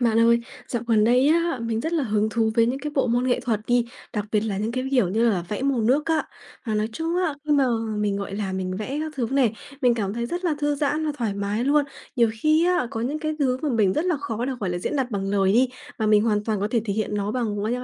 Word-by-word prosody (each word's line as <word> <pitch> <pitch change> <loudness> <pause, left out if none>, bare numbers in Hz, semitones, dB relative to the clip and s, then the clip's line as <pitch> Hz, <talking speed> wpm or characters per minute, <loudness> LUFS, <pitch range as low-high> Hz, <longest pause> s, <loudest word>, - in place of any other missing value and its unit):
Bạn 230 -2 +3
ơi, 235 +1 +5 0.3
dạo 240 -2 -2
gần 220 -2 +4
đây 250 +5 +4
á, 335 -4 +2
mình 230 -1 -1
rất 320 +7 -3
là 315 -5 +1
hứng 215 -1 +1
thú 225 0 +1
với 230 0 +4
những 255 +3 -1
cái 300 +1 -4
bộ 270 - +2
môn 245 +2 +1
nghệ 250 - +2
thuật 235 -4 -1
đi, 245 -1 +3 0.3
đặc 210 -2 -2
biệt 210 - +3
là 205 -3 -2
những 215 +3 -2
cái, 255 +1 -2
kiểu 250 -9 +3
như 225 +5 +2
là, 180 -5 -1
vẽ 210 +5 -3
màu 275 -3 +1
nước 270 +8 +2
á. 320 -1 +1 0.4
Mà 220 - -1
nói 215 +1 0
chung 325 +7 -2
á, 360 -5 +1
khi 300 - -4
mà 280 -2 +4 0.3
mình, 205 -1 0
gọi 200 -1 -4
là, 200 -2 -3
mình 185 0 -3
vẽ 260 +8 -3
các 315 - -5
thứ 245 -3 0
này, 265 -5 +3 0.3
mình 245 -2 +4
cảm 205 -3 -2
thấy 235 0 -2
rất 350 +7 -4
là 330 - +2
thư 295 0 +1
giãn 300 +2 0
và 300 - 0
thoải 220 -4 -1
mái 200 +3 -1
luôn. 290 +2 +3 0.3
Nhiều 235 -2 +4
khi 310 +4 +3
á, 355 -9 +2
có 225 - -4
những 275 +6 -2
cái 310 0 -2
thứ 260 -3 +1
mà 305 - 0
mình 215 -6 +3
rất 305 - 0
là 360 -3 +1
khó 245 -5 -3
được, 265 - -2
gọi 190 - -1
là, 175 - -2
diễn 235 - -2
đạt 260 -2 -1
bằng 195 -2 -2
lời 195 -1 +3
đi, 250 +3 +4 0.3
mà 220 - 0
mình 210 -1 +5
hoàn 210 -2 +1
toàn 215 -3 -1
có 205 - 0
thể 235 - +2
thể 205 - -1
hiện 215 0 -2
nó 205 0 -1
bằng 220 -4 -1
qu - - -2
qua 220 - 0
235 Hz, 295 wpm, -24 LUFS, 210-280 Hz, 0.4 s, ơi